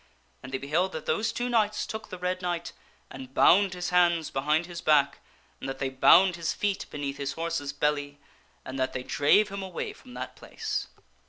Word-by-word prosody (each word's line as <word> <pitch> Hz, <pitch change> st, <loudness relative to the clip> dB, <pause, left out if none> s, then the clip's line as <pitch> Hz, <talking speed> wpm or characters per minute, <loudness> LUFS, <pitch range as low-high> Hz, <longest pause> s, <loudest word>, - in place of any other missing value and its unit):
And 130 Hz, -, -9 dB
they 135 Hz, -, -1 dB
beheld 160 Hz, +8 st, 0 dB
that 160 Hz, -, -6 dB
those 215 Hz, +8 st, 0 dB
two 245 Hz, -, -2 dB
knights 215 Hz, -3 st, +1 dB
took 220 Hz, 0 st, -7 dB
the 185 Hz, -, -7 dB
Red 180 Hz, +1 st, -2 dB
Knight 175 Hz, -1 st, -3 dB, 0.4 s
and 130 Hz, 0 st, -10 dB
bound 190 Hz, 0 st, +5 dB
his 180 Hz, 0 st, -3 dB
hands 170 Hz, -3 st, +3 dB
behind 150 Hz, +5 st, +1 dB
his 175 Hz, -1 st, -7 dB
back, 140 Hz, -2 st, +3 dB, 0.4 s
and 135 Hz, -, -5 dB
that 135 Hz, -, -4 dB
they 135 Hz, 0 st, -1 dB
bound 175 Hz, +7 st, +5 dB
his 165 Hz, -1 st, -1 dB
feet 200 Hz, -2 st, -2 dB
beneath 140 Hz, -1 st, -4 dB
his 140 Hz, -1 st, -3 dB
horse's 165 Hz, -4 st, -3 dB
belly, 145 Hz, 0 st, -1 dB, 0.5 s
and 130 Hz, +1 st, -6 dB
that 130 Hz, 0 st, 0 dB
they 130 Hz, -, -4 dB
drave 175 Hz, +11 st, +3 dB
him 200 Hz, 0 st, -5 dB
away 190 Hz, -2 st, -5 dB
from 250 Hz, -1 st, -15 dB
that -, -, -6 dB
place. 440 Hz, -, -4 dB
165 Hz, 195 wpm, -28 LUFS, 140-185 Hz, 0.5 s, bound